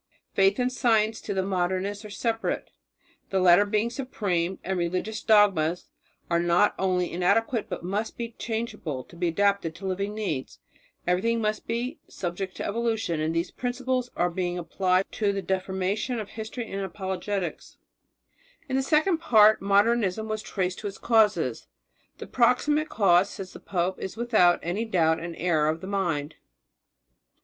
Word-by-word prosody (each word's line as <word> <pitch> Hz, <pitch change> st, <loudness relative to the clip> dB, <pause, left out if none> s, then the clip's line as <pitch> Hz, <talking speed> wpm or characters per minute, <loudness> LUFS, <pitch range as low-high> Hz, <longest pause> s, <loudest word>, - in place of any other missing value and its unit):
Faith 195 Hz, +1 st, +3 dB
and 250 Hz, 0 st, +1 dB
science 225 Hz, -3 st, +2 dB
to -, -, -5 dB
the 190 Hz, -1 st, 0 dB
Modernist 190 Hz, +2 st, -1 dB
are 210 Hz, -, -9 dB
separate, 225 Hz, +3 st, -2 dB, 0.6 s
the 190 Hz, -, +1 dB
latter 185 Hz, +2 st, +6 dB
being 215 Hz, +3 st, 0 dB
supreme, 190 Hz, -9 st, -2 dB
and 190 Hz, 0 st, -2 dB
religious 185 Hz, +5 st, -2 dB
dogmas 190 Hz, -6 st, +3 dB, 0.4 s
are 170 Hz, 0 st, +2 dB
not 175 Hz, +4 st, +3 dB
only 180 Hz, -2 st, +1 dB
inadequate 225 Hz, +6 st, +1 dB
but -, -, -5 dB
must 200 Hz, +5 st, -3 dB
be 235 Hz, -1 st, -4 dB
changeable 215 Hz, -, -4 dB
to 170 Hz, -, -17 dB
be 175 Hz, +1 st, -1 dB
adapted 200 Hz, -1 st, +1 dB
to 195 Hz, -, -9 dB
living 200 Hz, +2 st, -2 dB
needs. 160 Hz, -12 st, -3 dB, 0.5 s
Everything 210 Hz, +7 st, +1 dB
must 215 Hz, -1 st, -2 dB
be 240 Hz, +5 st, -3 dB
subject 185 Hz, +1 st, -5 dB
to -, -, -4 dB
evolution, 225 Hz, -6 st, -1 dB
and 160 Hz, +1 st, -1 dB
these 170 Hz, +2 st, -1 dB
principles 250 Hz, 0 st, -2 dB
were 175 Hz, 0 st, +1 dB
being 180 Hz, 0 st, -2 dB
applied 185 Hz, +2 st, +1 dB
to 205 Hz, -2 st, 0 dB
the 200 Hz, -, -2 dB
deformation 190 Hz, +5 st, -1 dB
of 210 Hz, -, -6 dB
history 225 Hz, +2 st, -6 dB
and 195 Hz, 0 st, -3 dB
of 190 Hz, -, -4 dB
apologetics. 190 Hz, -1 st, -4 dB, 0.9 s
In 260 Hz, -, -2 dB
the 265 Hz, -, +3 dB
second 315 Hz, +5 st, +2 dB
part 215 Hz, -8 st, +5 dB
Modernism 205 Hz, +1 st, +2 dB
was 215 Hz, 0 st, -3 dB
traced 185 Hz, -3 st, -2 dB
to 210 Hz, -, -4 dB
its 195 Hz, -, -7 dB
causes. 220 Hz, -3 st, +2 dB, 0.5 s
"The -, -, -7 dB
proximate 295 Hz, +6 st, +2 dB
cause," 190 Hz, -2 st, +4 dB
said 190 Hz, -2 st, -7 dB
the -, -, -11 dB
pope, 180 Hz, 0 st, -2 dB
"is 190 Hz, -, -6 dB
without 220 Hz, -7 st, +4 dB
any 180 Hz, +6 st, -1 dB
doubt 165 Hz, -7 st, +2 dB
an 170 Hz, 0 st, -6 dB
error 160 Hz, -4 st, +1 dB
of 160 Hz, +1 st, -1 dB
the 185 Hz, -, -8 dB
mind. 170 Hz, -7 st, -2 dB
195 Hz, 160 wpm, -26 LUFS, 180-225 Hz, 0.9 s, latter